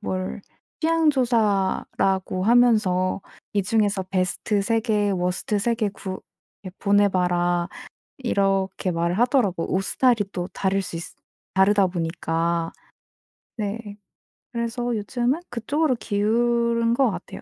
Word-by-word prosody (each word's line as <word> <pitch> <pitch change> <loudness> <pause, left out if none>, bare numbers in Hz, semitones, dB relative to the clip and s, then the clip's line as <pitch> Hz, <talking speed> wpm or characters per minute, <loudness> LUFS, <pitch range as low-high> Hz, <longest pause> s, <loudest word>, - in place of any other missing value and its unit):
뭘 185 -1 -3 0.4
취향 325 0 +3
조사라고 200 -6 +1
하면서 215 -6 +3 0.3
"이 200 - +2
중에서 205 -2 +1
베스트 185 +3 0
3 225 +2 +1
개 210 -3 +1
워스트 180 +3 -1
3 235 +3 +1
개 220 -3 0
구 190 -1 -7 0.5
예 - - -5
보내 205 0 +4
봐라." 175 -1 +1 0.5
이렇게 195 -5 0
말을 170 +3 0
하더라고 235 - +1
옷 190 - +2
스타일이 240 -3 +2
또 180 0 -3
다를 195 0 0
수 175 -2 -6
있으 165 +1 -7 0.4
다르다 195 +1 +4
보니까. 165 -1 -1 0.8
네. 205 0 -4 0.6
그래서 235 0 -2
요즘은 240 +7 -1
그쪽으로 265 +5 0
기운 235 +2 +1
것 260 -1 +3
같아요 180 -1 -8
205 Hz, 245 characters per minute, -24 LUFS, 185-235 Hz, 0.8 s, 보내